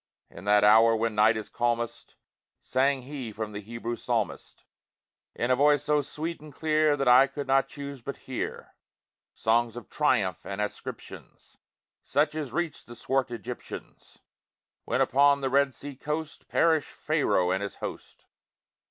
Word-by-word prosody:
In 90 Hz, -, -11 dB
that 105 Hz, 0 st, +4 dB
hour, 115 Hz, +2 st, +6 dB
when 115 Hz, 0 st, 0 dB
night 110 Hz, +1 st, +4 dB
is 110 Hz, -, -5 dB
calmest, 120 Hz, -1 st, -2 dB, 0.4 s
Sang 135 Hz, 0 st, +1 dB
he 130 Hz, -4 st, -6 dB
from 110 Hz, 0 st, -5 dB
the 105 Hz, 0 st, -6 dB
Hebrew 115 Hz, +2 st, -5 dB
Psalmist, -, -, -3 dB, 0.7 s
In 120 Hz, +2 st, 0 dB
a -, -, +5 dB
voice 145 Hz, +1 st, +4 dB
so 150 Hz, 0 st, +2 dB
sweet 155 Hz, +4 st, -5 dB
and 155 Hz, -1 st, -11 dB
clear 155 Hz, 0 st, +2 dB
That 135 Hz, -2 st, -1 dB
I 125 Hz, +2 st, +7 dB
could 145 Hz, 0 st, -6 dB
not 135 Hz, 0 st, +3 dB
choose 140 Hz, -2 st, -8 dB
but 140 Hz, +4 st, -6 dB
hear, 130 Hz, -, -5 dB, 0.6 s
Songs 115 Hz, +1 st, +1 dB
of 120 Hz, -, -10 dB
triumph, -, -, +1 dB
and 100 Hz, +1 st, -6 dB
ascriptions, 105 Hz, 0 st, -7 dB, 0.5 s
Such 145 Hz, +3 st, +1 dB
as 150 Hz, -5 st, -4 dB
reached 170 Hz, +1 st, -3 dB
the 120 Hz, -, -10 dB
swart 130 Hz, +1 st, 0 dB
Egyptians, 115 Hz, -5 st, -8 dB, 0.7 s
When -, -, 0 dB
upon 140 Hz, +1 st, +4 dB
the 135 Hz, -1 st, -1 dB
Red 140 Hz, -1 st, +3 dB
Sea 145 Hz, -1 st, -7 dB
coast 150 Hz, +3 st, -5 dB
Perished 160 Hz, -3 st, +2 dB
Pharaoh 140 Hz, -, +1 dB
and 95 Hz, +1 st, 0 dB
his 100 Hz, -, -5 dB
host. -, -, -8 dB
130 Hz, 155 wpm, -27 LUFS, 115-145 Hz, 0.7 s, I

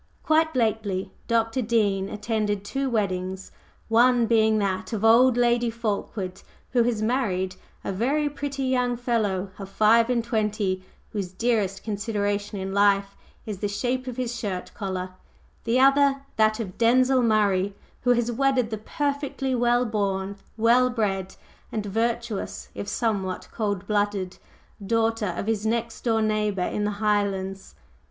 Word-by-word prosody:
Quite 315 Hz, 0 st, +2 dB
lately 215 Hz, -5 st, 0 dB, 0.2 s
Dr. 230 Hz, +1 st, +1 dB
Dean 205 Hz, -4 st, +1 dB
attended 210 Hz, -2 st, -2 dB
two 270 Hz, +5 st, -2 dB
weddings, 190 Hz, -4 st, -2 dB, 0.4 s
one 240 Hz, +1 st, +4 dB
being 220 Hz, -1 st, +3 dB
that 190 Hz, -2 st, -1 dB
of 220 Hz, 0 st, -1 dB
"old" 240 Hz, +2 st, +6 dB
Lady 240 Hz, 0 st, +3 dB
Fulkeward, 205 Hz, -4 st, -3 dB, 0.3 s
who 245 Hz, -, +3 dB
has 230 Hz, -2 st, 0 dB
married 195 Hz, -7 st, 0 dB, 0.3 s
a -, -, -2 dB
very 270 Hz, +10 st, +1 dB
pretty 280 Hz, -1 st, -4 dB
young 250 Hz, -2 st, +1 dB
fellow 210 Hz, -6 st, -1 dB
of 195 Hz, -1 st, -7 dB
five 225 Hz, +3 st, +4 dB
and 240 Hz, -2 st, +1 dB
twenty, 210 Hz, -4 st, -1 dB, 0.3 s
whose 195 Hz, -4 st, -3 dB
dearest 200 Hz, -2 st, 0 dB
consideration 205 Hz, -1 st, -2 dB
in 190 Hz, 0 st, -4 dB
life 200 Hz, 0 st, +3 dB, 0.3 s
is 210 Hz, -4 st, -5 dB
the 205 Hz, -, -1 dB
shape 250 Hz, +5 st, -2 dB
of 250 Hz, -1 st, -5 dB
his 245 Hz, -1 st, -2 dB
shirt 195 Hz, -5 st, -4 dB
collar; 185 Hz, -3 st, -4 dB, 0.5 s
the 235 Hz, +2 st, +2 dB
other, 275 Hz, 0 st, +4 dB
that 215 Hz, 0 st, +3 dB
of 190 Hz, -5 st, -6 dB
Denzil 255 Hz, +2 st, +4 dB
Murray, 200 Hz, -4 st, +2 dB, 0.3 s
who 245 Hz, 0 st, +4 dB
has 240 Hz, 0 st, 0 dB
wedded 255 Hz, -2 st, +1 dB
the 220 Hz, -, -3 dB
perfectly 280 Hz, +1 st, -2 dB
well 240 Hz, 0 st, +2 dB
born, 200 Hz, -3 st, -1 dB, 0.2 s
well 240 Hz, +3 st, +4 dB
bred 195 Hz, -6 st, -2 dB, 0.4 s
and 215 Hz, -2 st, -3 dB
virtuous, 225 Hz, +1 st, -2 dB
if 200 Hz, -, -6 dB
somewhat 200 Hz, -6 st, -2 dB
cold 205 Hz, -4 st, -2 dB
blooded, 205 Hz, -3 st, -1 dB, 0.4 s
daughter 225 Hz, -1 st, +1 dB
of -, -, -3 dB
his 220 Hz, -2 st, -1 dB
next 230 Hz, +1 st, -1 dB
door 225 Hz, -2 st, +2 dB
neighbor 210 Hz, -3 st, 0 dB
in 210 Hz, -, -2 dB
the -, -, +1 dB, 0.2 s
Highlands. 195 Hz, -, -1 dB
220 Hz, 145 wpm, -25 LUFS, 200-240 Hz, 0.5 s, old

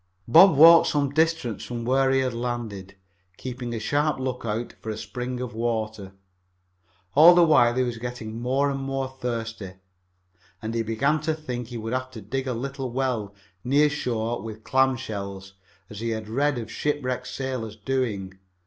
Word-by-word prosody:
Bob 165 Hz, +5 st, +7 dB
walked 165 Hz, +2 st, +9 dB
some 140 Hz, -2 st, 0 dB
distance 160 Hz, -7 st, 0 dB
from 120 Hz, -1 st, -5 dB
where 135 Hz, +2 st, +3 dB
he 135 Hz, 0 st, +3 dB
had 130 Hz, -2 st, -1 dB
landed, 115 Hz, -5 st, -5 dB, 0.4 s
keeping 125 Hz, -1 st, -6 dB
a 115 Hz, -, -3 dB
sharp 145 Hz, +6 st, 0 dB
lookout 120 Hz, -3 st, -3 dB
for 110 Hz, -, -6 dB
a 110 Hz, -, -3 dB
spring 125 Hz, +4 st, -5 dB
of 125 Hz, -1 st, -5 dB
water. 110 Hz, -3 st, -3 dB, 1.0 s
All 165 Hz, +5 st, +8 dB
the 175 Hz, -, +6 dB
while 120 Hz, -7 st, +4 dB
he 130 Hz, -, +2 dB
was 120 Hz, -2 st, -3 dB
getting 115 Hz, -2 st, -6 dB
more 135 Hz, +3 st, +1 dB
and 135 Hz, -, -3 dB
more 135 Hz, 0 st, -2 dB
thirsty, 115 Hz, -6 st, -5 dB, 0.9 s
and 110 Hz, +2 st, -5 dB
he 115 Hz, -, 0 dB
began 135 Hz, +8 st, 0 dB
to 155 Hz, 0 st, -1 dB
think 125 Hz, -6 st, -5 dB
he 120 Hz, 0 st, -7 dB
would 115 Hz, +1 st, -4 dB
have 130 Hz, 0 st, -2 dB
to 115 Hz, -, -7 dB
dig 135 Hz, +3 st, -4 dB
a 125 Hz, -, -1 dB
little 135 Hz, +1 st, -4 dB
well 120 Hz, -6 st, -2 dB, 0.3 s
near 145 Hz, +3 st, +3 dB
shore 120 Hz, -6 st, -2 dB
with 110 Hz, 0 st, -8 dB
clam 130 Hz, 0 st, +3 dB
shells, 100 Hz, -4 st, -6 dB, 0.3 s
as 105 Hz, -, -9 dB
he 115 Hz, +1 st, -2 dB
had 110 Hz, -1 st, -4 dB
read 140 Hz, +5 st, 0 dB
of 115 Hz, -2 st, -6 dB
shipwrecked 130 Hz, -4 st, -2 dB
sailors 130 Hz, -5 st, -4 dB
doing. 105 Hz, -5 st, -3 dB
125 Hz, 175 wpm, -25 LUFS, 110-135 Hz, 1.0 s, walked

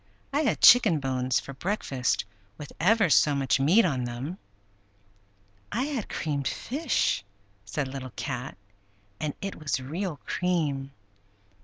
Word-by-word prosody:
I 290 Hz, -, +2 dB
had 290 Hz, -, 0 dB
chicken 215 Hz, -10 st, +7 dB
bones 130 Hz, -2 st, 0 dB
for 140 Hz, -, -9 dB
breakfast, 135 Hz, -, -1 dB, 0.3 s
with 150 Hz, -, -9 dB
ever 210 Hz, +3 st, +4 dB
so 150 Hz, -2 st, +4 dB
much 135 Hz, -1 st, +1 dB
meat 180 Hz, +11 st, +5 dB
on 130 Hz, -7 st, 0 dB
them!" 130 Hz, +10 st, -5 dB, 1.3 s
"I 235 Hz, +5 st, 0 dB
had 275 Hz, -7 st, -3 dB
creamed 140 Hz, -3 st, -2 dB
fish," 265 Hz, -, 0 dB, 0.4 s
said 140 Hz, +4 st, -2 dB
Little 130 Hz, -1 st, -7 dB
Cat; 125 Hz, -1 st, -5 dB, 0.6 s
"and 150 Hz, -2 st, -3 dB
it 195 Hz, -, -4 dB
was 140 Hz, -4 st, -2 dB
real 160 Hz, +5 st, -4 dB
cream. 150 Hz, -7 st, -1 dB
150 Hz, 130 wpm, -27 LUFS, 135-195 Hz, 1.3 s, chicken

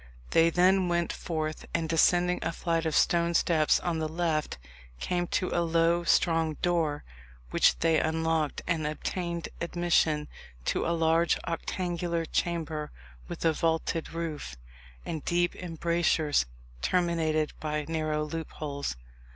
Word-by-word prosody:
They 165 Hz, 0 st, +5 dB
then 185 Hz, +2 st, +4 dB
went 175 Hz, 0 st, 0 dB
forth, 155 Hz, -2 st, -4 dB
and 165 Hz, -1 st, 0 dB
descending 175 Hz, +2 st, +3 dB
a -, -, -1 dB
flight 165 Hz, -1 st, -1 dB
of 155 Hz, -, -1 dB
stone 170 Hz, 0 st, +3 dB
steps 155 Hz, -3 st, +3 dB
on 170 Hz, -2 st, -1 dB
the 155 Hz, -1 st, -2 dB
left, 160 Hz, -, -1 dB, 0.4 s
came 175 Hz, -, -1 dB
to 185 Hz, -, 0 dB
a 175 Hz, -, +1 dB
low 170 Hz, +1 st, +2 dB
strong 165 Hz, -2 st, +2 dB
door, 165 Hz, -4 st, +1 dB, 0.5 s
which -, -, +4 dB
they 165 Hz, -1 st, +3 dB
unlocked, 160 Hz, -1 st, 0 dB
and 160 Hz, -3 st, 0 dB
obtained 170 Hz, +2 st, -3 dB
admission 170 Hz, -3 st, +1 dB, 0.4 s
to -, -, 0 dB
a 170 Hz, 0 st, +1 dB
large 165 Hz, +1 st, +3 dB
octangular 170 Hz, 0 st, -2 dB
chamber 160 Hz, -3 st, -2 dB, 0.4 s
with -, -, -5 dB
a 165 Hz, -, +4 dB
vaulted 165 Hz, 0 st, -1 dB
roof, 160 Hz, -, -5 dB, 0.5 s
and 160 Hz, -3 st, -4 dB
deep 175 Hz, 0 st, +1 dB
embrasures 165 Hz, -, +1 dB, 0.3 s
terminated 165 Hz, -4 st, +1 dB
by 150 Hz, -1 st, -2 dB
narrow 155 Hz, -2 st, -1 dB
loopholes. 150 Hz, -, -4 dB
165 Hz, 130 wpm, -29 LUFS, 155-170 Hz, 0.5 s, They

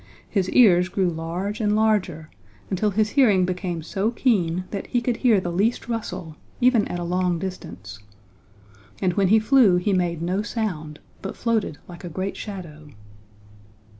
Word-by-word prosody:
His 190 Hz, -3 st, 0 dB
ears 185 Hz, -7 st, +5 dB
grew 185 Hz, -2 st, 0 dB
large 175 Hz, +6 st, -4 dB
and 210 Hz, -1 st, +2 dB
larger 200 Hz, -8 st, 0 dB, 0.4 s
until 200 Hz, +3 st, +1 dB
his 210 Hz, +2 st, 0 dB
hearing 210 Hz, -10 st, +4 dB
became 180 Hz, -2 st, -3 dB
so 195 Hz, +6 st, -1 dB
keen 185 Hz, -8 st, +1 dB
that 200 Hz, -, -5 dB
he 245 Hz, -, +1 dB
could 240 Hz, 0 st, -1 dB
hear 230 Hz, -6 st, +4 dB
the 175 Hz, -1 st, -4 dB
least 205 Hz, +9 st, 0 dB
rustle, 180 Hz, -9 st, -5 dB, 0.2 s
even 245 Hz, -4 st, +3 dB
at 175 Hz, -, -4 dB
a 175 Hz, -, -4 dB
long 180 Hz, 0 st, 0 dB
distance. 105 Hz, -, -7 dB, 1.0 s
And 185 Hz, -2 st, +1 dB
when 195 Hz, +1 st, +2 dB
he 215 Hz, +4 st, +5 dB
flew 220 Hz, -3 st, +5 dB
he 195 Hz, +3 st, 0 dB
made 170 Hz, -3 st, 0 dB
no 185 Hz, +4 st, 0 dB
sound, 180 Hz, -10 st, -4 dB, 0.2 s
but 195 Hz, -, -6 dB
floated 225 Hz, -9 st, -1 dB
like 175 Hz, -2 st, -11 dB
a 175 Hz, -, -5 dB
great 185 Hz, +4 st, -4 dB
shadow. 165 Hz, -7 st, -8 dB
185 Hz, 165 wpm, -23 LUFS, 175-215 Hz, 1.0 s, ears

